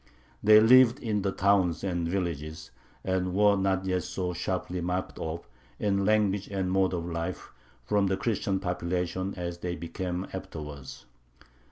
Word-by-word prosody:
They 105 Hz, +1 st, +8 dB
lived 120 Hz, +2 st, +7 dB
in 105 Hz, -3 st, -1 dB
the 95 Hz, 0 st, 0 dB
towns 95 Hz, -3 st, +2 dB
and 85 Hz, -3 st, -1 dB
villages, 85 Hz, -4 st, -3 dB, 0.3 s
and 90 Hz, -1 st, -1 dB
were 105 Hz, 0 st, +5 dB
not 95 Hz, -1 st, 0 dB
yet 90 Hz, -1 st, 0 dB
so 90 Hz, -1 st, -3 dB
sharply 90 Hz, +1 st, -3 dB
marked 90 Hz, +2 st, -3 dB
off, 80 Hz, +1 st, -5 dB, 0.3 s
in 100 Hz, -1 st, 0 dB
language 105 Hz, -2 st, +2 dB
and 95 Hz, -2 st, -2 dB
mode 95 Hz, -1 st, +2 dB
of 85 Hz, -1 st, -3 dB
life, 85 Hz, +1 st, -4 dB, 0.3 s
from 100 Hz, +10 st, +1 dB
the 95 Hz, 0 st, 0 dB
Christian 100 Hz, -4 st, -1 dB
population 90 Hz, +1 st, -2 dB
as 85 Hz, -1 st, -4 dB
they 90 Hz, 0 st, -3 dB
became 90 Hz, +2 st, -4 dB
afterwards. 75 Hz, -8 st, -8 dB
95 Hz, 150 wpm, -28 LUFS, 85-100 Hz, 0.3 s, They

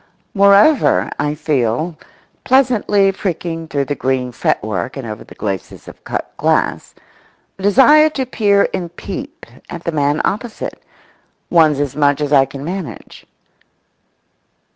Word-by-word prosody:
Moreover, 200 Hz, +9 st, +4 dB
I 145 Hz, +1 st, -1 dB
feel, 150 Hz, +2 st, -1 dB, 0.5 s
pleasantly 235 Hz, -7 st, +3 dB
pricking 170 Hz, -4 st, -4 dB
through 140 Hz, -3 st, -1 dB
the 145 Hz, -, -2 dB
green 130 Hz, -2 st, -2 dB
fretwork 105 Hz, -3 st, -2 dB
and 135 Hz, -, -6 dB
over 110 Hz, -1 st, -7 dB
the -, -, -15 dB
glacis 95 Hz, -3 st, -5 dB
of -, -, -13 dB
cut -, -, -5 dB
glass, -, -, 0 dB, 0.6 s
a -, -, -9 dB
desire 270 Hz, +10 st, +6 dB
to 270 Hz, -4 st, -3 dB
peer 205 Hz, -5 st, +2 dB
and 175 Hz, -1 st, -5 dB
peep 280 Hz, -, -8 dB, 0.2 s
at 170 Hz, -1 st, -7 dB
the 170 Hz, -, -2 dB
man 145 Hz, -1 st, 0 dB
opposite—one's 170 Hz, -, -2 dB
as 145 Hz, -3 st, -2 dB
much 145 Hz, -1 st, +2 dB
as 150 Hz, -1 st, -1 dB
I 135 Hz, -1 st, +6 dB
can 135 Hz, +1 st, -9 dB
manage. 180 Hz, -1 st, -7 dB
165 Hz, 130 wpm, -17 LUFS, 140-200 Hz, 0.6 s, desire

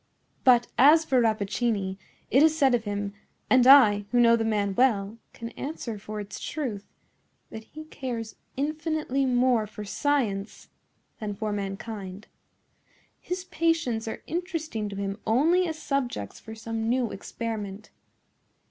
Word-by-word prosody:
"But 245 Hz, -2 st, +6 dB
as 305 Hz, +5 st, +7 dB
for 260 Hz, -4 st, +3 dB
Rappaccini, 210 Hz, -2 st, 0 dB, 0.3 s
it 270 Hz, -, +5 dB
is 315 Hz, 0 st, +4 dB
said 270 Hz, -4 st, +4 dB
of 230 Hz, -2 st, +1 dB
him—and 205 Hz, +5 st, 0 dB
I, 215 Hz, -7 st, +7 dB
who 245 Hz, -, +2 dB
know 235 Hz, -1 st, +6 dB
the 225 Hz, -, 0 dB
man 205 Hz, -3 st, 0 dB
well, 215 Hz, -2 st, +1 dB
can 230 Hz, -, -7 dB
answer 240 Hz, -5 st, -6 dB
for 210 Hz, +1 st, -6 dB
its 205 Hz, -1 st, -7 dB
truth—that 220 Hz, -3 st, -8 dB
he 310 Hz, +6 st, -10 dB
cares 240 Hz, -7 st, -6 dB, 0.2 s
infinitely 305 Hz, -2 st, -1 dB
more 245 Hz, -3 st, +2 dB
for 210 Hz, 0 st, -8 dB
science 215 Hz, -5 st, -1 dB, 0.5 s
than 210 Hz, -2 st, -4 dB
for 215 Hz, +1 st, -3 dB
mankind. 200 Hz, 0 st, -5 dB, 0.9 s
His 365 Hz, +1 st, -4 dB
patients 330 Hz, -11 st, 0 dB
are 220 Hz, -, -5 dB
interesting 320 Hz, -, -3 dB
to 200 Hz, -, -7 dB
him 200 Hz, +1 st, -4 dB
only 330 Hz, +11 st, +3 dB
as 320 Hz, -1 st, -4 dB
subjects 260 Hz, -, -3 dB
for 220 Hz, 0 st, -10 dB
some 225 Hz, 0 st, -3 dB
new 245 Hz, -2 st, +1 dB
experiment. 210 Hz, -1 st, -6 dB
230 Hz, 135 wpm, -27 LUFS, 210-275 Hz, 0.9 s, as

